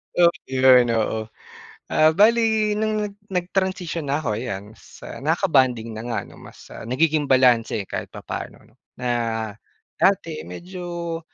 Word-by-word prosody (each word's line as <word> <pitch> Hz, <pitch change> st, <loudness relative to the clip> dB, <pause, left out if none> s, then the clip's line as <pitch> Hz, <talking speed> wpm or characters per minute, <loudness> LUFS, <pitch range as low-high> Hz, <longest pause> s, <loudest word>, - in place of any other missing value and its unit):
tapos 170 Hz, -1 st, +4 dB
yun, 130 Hz, -2 st, +5 dB
oo. 110 Hz, 0 st, -1 dB, 0.6 s
Ah, 155 Hz, 0 st, +4 dB
bale 220 Hz, +1 st, +4 dB
nung 215 Hz, 0 st, 0 dB
nag 205 Hz, -1 st, -5 dB
nag-transition 180 Hz, -4 st, -2 dB
na 145 Hz, +3 st, -1 dB
ako 110 Hz, -3 st, -1 dB
ayan, 105 Hz, -3 st, -6 dB
sa -, -, -11 dB
nakakabonding 135 Hz, -, +1 dB
na 110 Hz, 0 st, -6 dB
nga 115 Hz, -, -1 dB
'no. -, -, -15 dB
Mas, -, -, -14 dB
ah, -, -, -9 dB
nagiging 150 Hz, +3 st, +1 dB
balanse 125 Hz, -5 st, +3 dB
kahit -, -, -4 dB
papano -, -, -7 dB
'no, 110 Hz, -, -25 dB, 0.3 s
na 125 Hz, 0 st, -2 dB, 0.9 s
dati 75 Hz, -, +1 dB
medyo 175 Hz, -, -6 dB
150 Hz, 140 wpm, -23 LUFS, 120-180 Hz, 0.9 s, yun